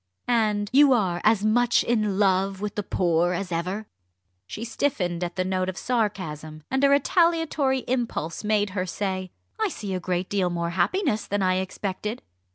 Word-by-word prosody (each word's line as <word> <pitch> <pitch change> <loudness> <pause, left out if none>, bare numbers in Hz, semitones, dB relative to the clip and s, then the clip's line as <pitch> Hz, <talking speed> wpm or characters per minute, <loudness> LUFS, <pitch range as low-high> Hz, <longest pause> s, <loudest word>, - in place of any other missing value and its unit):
"And 215 -4 +1
you 280 0 +7
are 185 -7 0
as 215 -1 +3
much 240 +2 +3
in 215 -4 0
love 195 -1 +2
with 205 0 -3
the 210 - -2
poor 175 -2 +1
as 185 0 -4
ever?" 180 +6 -2 0.6
She 220 - -6
stiffened 185 -9 -1
at 175 0 -4
the 185 - -1
note 185 0 0
of 185 - -6
sarcasm, 160 -10 -2
and 265 +1 +1
a 280 - +6
retaliatory 295 -2 +2
impulse 235 -10 -2
made 210 -1 +1
her 185 -1 -2
say: 185 0 -3 0.3
"I 435 - +2
see 205 - -5
a 185 - -1
great 180 0 -2
deal 190 -3 0
more 170 -1 -2
happiness 215 - 0
than 205 0 0
I 185 0 +2
expected." 200 +4 -4
200 Hz, 170 wpm, -25 LUFS, 185-235 Hz, 0.6 s, you